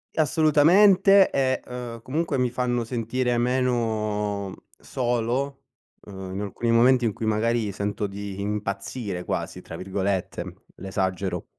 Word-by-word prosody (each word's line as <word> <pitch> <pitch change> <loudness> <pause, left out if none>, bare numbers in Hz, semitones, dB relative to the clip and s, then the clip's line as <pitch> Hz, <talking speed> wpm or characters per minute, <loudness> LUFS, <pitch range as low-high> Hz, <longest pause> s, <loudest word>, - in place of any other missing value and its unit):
Assolutamente, 180 +6 +5
e, 130 -1 +1
ehm, 120 -2 -7
comunque 145 +3 -1
mi 125 -1 +1
fanno 120 0 -1
sentire 120 +1 -1
meno 110 -5 0 0.2
solo, 125 +3 -2 0.4
uhm, 95 -2 -8
in 95 - -3
alcuni 105 +3 -3
momenti 125 +1 +5
in 110 - 0
cui 110 - -5
magari 110 0 +1
sento 100 +1 -2
di 100 0 -6
impazzire 100 -1 -3
quasi - - -4
tra 80 - -9
virgolette, 95 0 -3
l'esagero. 95 -1 -2
115 Hz, 120 wpm, -25 LUFS, 100-130 Hz, 0.4 s, Assolutamente